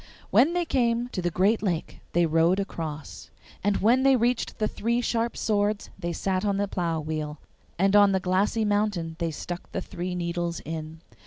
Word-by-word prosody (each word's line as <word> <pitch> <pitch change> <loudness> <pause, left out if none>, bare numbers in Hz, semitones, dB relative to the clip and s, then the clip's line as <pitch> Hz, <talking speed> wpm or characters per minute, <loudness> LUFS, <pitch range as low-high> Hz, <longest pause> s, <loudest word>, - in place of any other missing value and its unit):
When 320 +6 +5
they 350 -1 0
came 240 -4 +1
to 185 - -3
the 175 - 0
great 195 +6 +2
lake 180 -6 -2
they 175 0 +4
rowed 165 +4 +3
across, 160 -6 -5 0.3
and 205 0 +2
when 240 +5 +4
they 270 0 +5
reached 240 0 0
the 215 - +1
three 235 +3 -1
sharp 235 -1 -1
swords 210 -1 0
they 170 - -2
sat 185 +2 -1
on 200 -2 +1
the 205 0 0
plough 170 -4 -1
wheel, 155 -1 -4 0.4
and 195 +3 +3
on 205 -1 +7
the 190 - +2
glassy 195 +4 +1
mountain 205 -6 0
they 170 -1 0
stuck 175 +3 -6
the - - -2
three 180 -1 -5
needles 170 -1 -2
in. 160 0 -6
190 Hz, 185 wpm, -26 LUFS, 170-215 Hz, 0.4 s, on